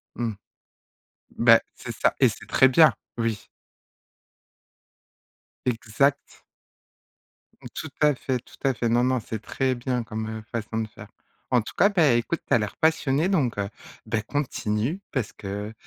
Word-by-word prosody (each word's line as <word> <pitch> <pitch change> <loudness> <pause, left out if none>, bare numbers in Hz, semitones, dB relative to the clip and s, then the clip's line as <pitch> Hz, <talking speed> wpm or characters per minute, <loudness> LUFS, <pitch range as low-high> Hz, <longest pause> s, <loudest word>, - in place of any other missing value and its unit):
Mmh. 115 -2 -2 1.0
Bah, - - +7
c'est - - -7
ça - - +2
et - - +6
c'est - - -9
très 130 - +5
bien, 145 +1 +6 0.2
oui. 115 -3 -1 2.3
Exact. 125 +4 0 1.3
Tout - - -6
à 150 -2 +5
fait, 130 0 -2
tout - - -18
à 135 -1 +3
fait, 120 -1 -1
non, 120 +1 +3
non, 130 0 +2
c'est 110 0 -5
très 130 +2 -1
bien 125 0 -2
comme, 110 -1 -5
heu, 110 0 -5
façon 110 -1 -3
de 110 - -3
faire. - - -13 0.4
En 125 -2 +4
tout 110 - -9
cas, 200 - +5
bah 170 -9 +4
écoute, 120 +8 0
tu - - +1
as - - +7
l'air 105 -1 -4
passionné, 160 -1 +2
donc, 150 - +1
heu, 100 -1 -2 0.4
bah, 110 - -1
continue 125 - -2
parce 125 -6 -2
que 105 +1 -6
120 Hz, 155 wpm, -25 LUFS, 110-140 Hz, 2.3 s, Bah